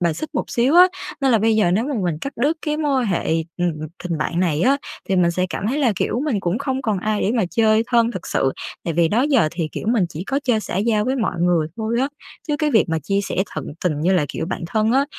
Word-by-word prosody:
bài 170 -2 +1
xích 310 - -5
một - - 0
xíu 250 +6 +2
á. 360 +1 +9 0.3
Nên 270 - +3
là 225 - +5
bây 220 +1 +2
giờ 180 -5 +3
nếu 215 +7 +1
mà 285 -1 -2
mình 165 -4 -1
cắt 275 - -4
đứt 290 +7 +1
cái 300 -1 -1
mối 290 -4 +1
quan 235 - -1
hệ, 175 -4 0 0.2
ừm, 175 -1 0 0.3
tình 170 -3 -2
bạn 170 +3 -1
này 165 -4 +1
á, 275 +5 +4 0.3
thì 190 - +1
mình 175 -1 +3
sẽ 180 +2 0
cảm 200 - -3
thấy 265 +7 0
là, 260 -6 +3
kiểu, 240 - -1
mình 240 -10 0
cũng 180 +3 -1
không 265 -1 -2
còn 215 -5 0
ai 215 +2 -1
để 210 - +1
mà 220 - +2
chơi 220 -1 +3
thân 235 -1 +3
thực 185 - -6
sự. 135 - +1 0.3
Tại 165 - -2
vì 170 -1 +3
đó 235 +5 +2
giờ 270 - +3
thì, 165 -2 -3
kiểu, - - -5
mình 225 -5 +3
chỉ 170 +3 -7
có 275 - 0
chơi 235 -4 +2
xã 180 - -5
giao 210 +1 +1
với 260 +3 0
mọi 210 -8 -1
người 175 -3 +2
thôi 230 +2 -1
á, 270 - +1 0.4
chứ 295 - +1
cái 305 -1 +1
việc 225 - +4
mà 160 0 0
chia 195 +7 -1
sẻ 200 - -4 0.2
tận - - -4 0.2
tình 150 -4 0
như 175 +5 +2
là, 170 -5 +3
kiểu, 160 - -4
bạn 185 - -4
thân 215 +4 +1
á 270 +2 +3
215 Hz, 285 wpm, -21 LUFS, 175-255 Hz, 0.4 s, á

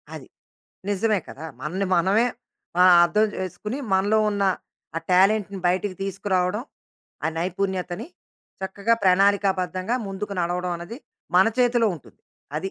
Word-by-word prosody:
అది. - - -10 0.6
నిజమే 205 +1 +1
కదా! 150 - -9 0.2
మనని 185 +7 -2
మనమే 195 +7 +3 0.5
ఆహ్, 180 -1 +8
అర్థం 210 +5 +2
చేసుకొని 210 - -4
మనలో 200 +3 +3
ఉన్న 200 -1 -1 0.5
ఆ - - +2
టాలెంట్‌ని 195 +1 +3
బయటికి 185 +2 0
తీసుకురావడం 195 +1 -1 0.6
ఆ - - +3
నైపుణ్యతని 185 +1 -2 0.6
చక్కగా 200 +4 +1
ప్రణాళికాబద్ధంగా 190 +1 +2
ముందుకు 195 +1 -5
నడవడం 175 +1 -1
అన్నది 175 +9 -8 0.4
మన 190 - +6
చేతిలో 240 -2 +3
ఉంటుంది. 155 - -16 0.4
అది 190 +5 -3
190 Hz, 120 wpm, -24 LUFS, 180-205 Hz, 0.6 s, ఆహ్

